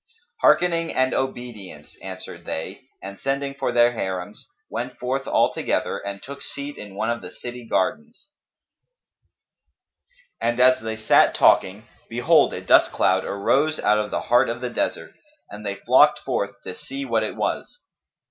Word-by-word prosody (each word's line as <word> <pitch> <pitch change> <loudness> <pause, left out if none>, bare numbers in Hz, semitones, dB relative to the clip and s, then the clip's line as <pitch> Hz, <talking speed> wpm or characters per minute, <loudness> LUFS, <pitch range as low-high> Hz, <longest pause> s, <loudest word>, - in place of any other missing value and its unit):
"Hearkening 165 -2 +3
and 130 0 +1
obedience," 120 - -5
answered 95 -1 -8
they 95 +10 -5 0.2
and, 100 +1 -8
sending 140 0 -2
for 140 - -2
their 120 0 +4
Harims, 95 -3 -5 0.2
went 125 +1 -5
forth 130 +2 -3
all - - +2
together - - -1
and 100 0 -7
took 140 +1 -9
seat 140 +1 -6
in 105 -2 -10
one 110 +3 -1
of 120 - -3
the - - -8
city 120 -1 -8
gardens; 225 - -2 2.1
and 120 +1 0
as 130 +1 +5
they 110 0 -4
sat 110 - +4
talking, 100 +4 +3 0.2
behold, 120 +1 +3
a - - -5
dust - - +5
cloud 95 +1 +2
arose 140 +10 +1
out 105 0 +3
of 105 - -2
the - - -2
heart 120 +2 +3
of 120 0 -3
the 125 0 -4
desert, - - -3 0.4
and 105 +1 -9
they 100 -1 -3
flocked - - +4
forth 100 0 -3
to - - -6
see 135 +8 -6
what 115 -3 +1
it 110 - -3
was. - - -3
120 Hz, 160 wpm, -23 LUFS, 100-135 Hz, 2.1 s, as